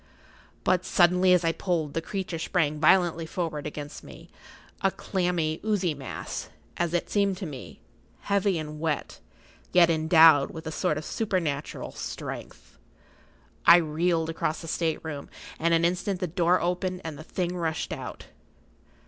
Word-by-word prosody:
But 185 -1 +2
suddenly, 180 0 +4
as 180 -2 +4
I 165 - +3
pulled, 165 -4 -2
the 165 - -1
creature 185 -2 -4
sprang 155 -4 0
violently 165 0 +3
forward 160 -4 -3
against 145 -1 -7
me, - - -13 0.5
a 195 - +4
clammy, 175 -5 -1
oozy 200 -6 +1
mass, 135 -2 -6 0.3
as 175 0 -1
it 175 - 0
seemed 200 -2 +1
to 190 - -5
me, 140 -6 -9 0.4
heavy 200 -2 +1
and 150 -1 -6
wet, 155 -2 -2 0.5
yet 170 -2 +6
endowed 160 -2 +6
with 160 0 -9
a 160 - -4
sort 150 -1 0
of 155 - -5
supernatural 170 -9 -2
strength. - - -8 0.9
I 170 - +11
reeled 165 0 0
across 160 -1 -2
the 165 - -8
state 165 0 -1
room, 145 -3 -6 0.3
and 170 +1 +2
in 165 0 +4
an - - +3
instant 180 +2 -1
the 180 - -1
door 175 +1 +2
opened 180 +1 -2
and 160 -2 -5
the 155 - -9
thing 180 +1 -3
rushed 165 -2 -2
out. - - -7
170 Hz, 155 wpm, -27 LUFS, 155-180 Hz, 0.9 s, I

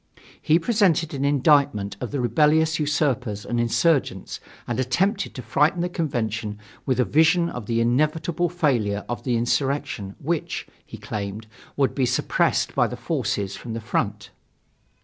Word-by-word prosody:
He 155 - +4
presented 175 -5 +2
an 140 -1 -2
indictment 140 -7 +2
of 125 - -3
the 140 - -3
rebellious 155 +7 +3
usurpers 135 -8 0
and 120 - -1
insurgents 120 - +1 0.3
and 120 +1 -2
attempted 190 - 0
to 125 - -6
frighten 155 +5 +2
the 175 - -1
Convention 115 - -2 0.3
with 130 -2 +1
a 125 - +4
vision 160 +3 +3
of 120 -4 -7
the 115 0 +1
inevitable 155 +8 +1
failure 120 -12 0
of 120 - -4
the 125 -3 +1
insurrection, 130 -4 -1
which, 165 +2 -3 0.2
he - - -10
claimed, 105 +1 -5 0.3
would 135 -2 +2
be 130 -3 +1
suppressed 125 - +1
by - - +3
the - - -6
forces 100 -1 -2
from 115 - -7
the 115 - -3
front. 105 -3 -2
130 Hz, 150 wpm, -24 LUFS, 115-155 Hz, 0.3 s, He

